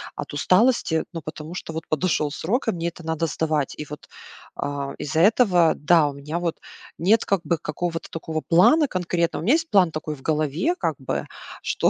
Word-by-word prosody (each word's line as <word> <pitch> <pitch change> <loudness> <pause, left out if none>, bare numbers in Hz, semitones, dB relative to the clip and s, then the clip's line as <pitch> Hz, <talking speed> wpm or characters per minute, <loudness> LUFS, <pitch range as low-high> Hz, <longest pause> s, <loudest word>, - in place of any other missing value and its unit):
от - - -6
усталости. 185 - +3
Но 165 - -5
потому 155 +2 -8
что 170 - -6
вот 160 0 -6
подошел 155 -2 0
срок, 225 - -1
а - - +4
мне 170 -1 -3
это 170 -1 -7
надо 160 0 -1
сдавать. 155 -2 -1
И 150 - -5
вот, 150 - -9 0.5
а, 140 -1 -3
из-за 155 +2 -2
этого, 180 -4 +5
да, 160 0 +4
у - - -7
меня 150 +5 -4
вот 170 -2 -2 0.4
нет 205 +7 +3
как 195 -3 +1
бы 165 +2 0
какого-то 165 +2 -4
такого 160 -1 -4
плана 280 - +5
конкретного. 175 -3 -1
У - - -4
меня 250 - +5
есть 325 0 +1
план 185 -4 +4
такой 155 -1 -4
в 135 - -17
голове 155 - 0
как - - 0
бы, - - -3 0.3
что, - - +1
165 Hz, 195 wpm, -23 LUFS, 155-180 Hz, 0.5 s, этого